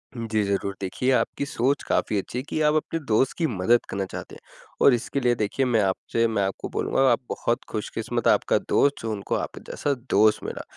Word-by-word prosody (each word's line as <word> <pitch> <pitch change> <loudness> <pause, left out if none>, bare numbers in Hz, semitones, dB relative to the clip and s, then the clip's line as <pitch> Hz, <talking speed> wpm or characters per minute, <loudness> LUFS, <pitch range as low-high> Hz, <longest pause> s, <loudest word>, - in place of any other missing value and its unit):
जी, 110 -2 -1
ज़रूर। 100 0 -1
देखिए 115 +7 -1
आपकी 135 +2 0
सोच 140 +1 0
काफ़ी 105 - 0
अच्छी 100 +5 -4
है 125 - -2
कि - - -2
आप 150 0 +4
अपने 160 +1 -1
दोस्त 120 +3 +2
की 165 - +1
मदद 115 +1 +2
करना 95 0 -2
चाहते - - -7
हैं, - - -13 0.4
और 140 - +7
इसके 125 +3 -1
लिए 120 -2 +2
देखिए 110 +5 0
मैं 120 -3 +2
आपसे 100 +4 0
मैं 110 -3 0
आपको 95 0 -3
बोलूँगा - - 0
आप 120 - +2
बहुत 120 +2 -1
खुशकिस्मत 105 -2 -3
आपका - - +3
दोस्त 145 0 +2
जो 115 - -3
उनको 100 -2 -2
आपके - - -4
जैसा 145 - -1 0.2
दोस्त 105 +2 +4
मिला। - - -5
115 Hz, 205 wpm, -25 LUFS, 105-135 Hz, 0.4 s, और